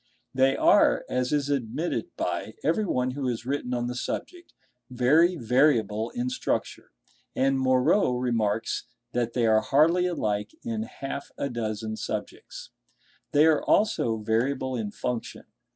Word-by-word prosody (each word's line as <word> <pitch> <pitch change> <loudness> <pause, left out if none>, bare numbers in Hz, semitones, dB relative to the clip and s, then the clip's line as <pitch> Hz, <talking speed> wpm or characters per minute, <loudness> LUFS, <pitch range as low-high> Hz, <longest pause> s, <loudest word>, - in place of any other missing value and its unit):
They 135 +1 +3
are, - - +4
as 125 0 -1
is 145 -1 0
admitted 140 +5 -2
by - - -3
everyone 130 - +1
who 135 0 -3
has 120 -1 -3
written 135 -1 -2
on 120 0 -1
the 125 - -3
subject, 345 - -5 0.4
very 150 +8 +3
variable 120 - +2
in 125 +1 -2
structure; - - -3 0.5
and 135 0 +2
Moreau 130 +4 +3
remarks 115 -3 -1 0.3
that 120 -2 -1
they 120 -2 +1
are 110 -1 +4
hardly 160 +9 +3
alike 110 - -2
in 230 -2 -3
half 140 -9 -6
a 140 - -2
dozen 110 -2 -3
subjects. - - -6 0.6
They 150 +2 +5
are 160 -2 +3
also 200 - +2
variable 125 +5 -1
in 110 -4 -3
function. 120 +3 -5
125 Hz, 135 wpm, -26 LUFS, 115-145 Hz, 0.6 s, They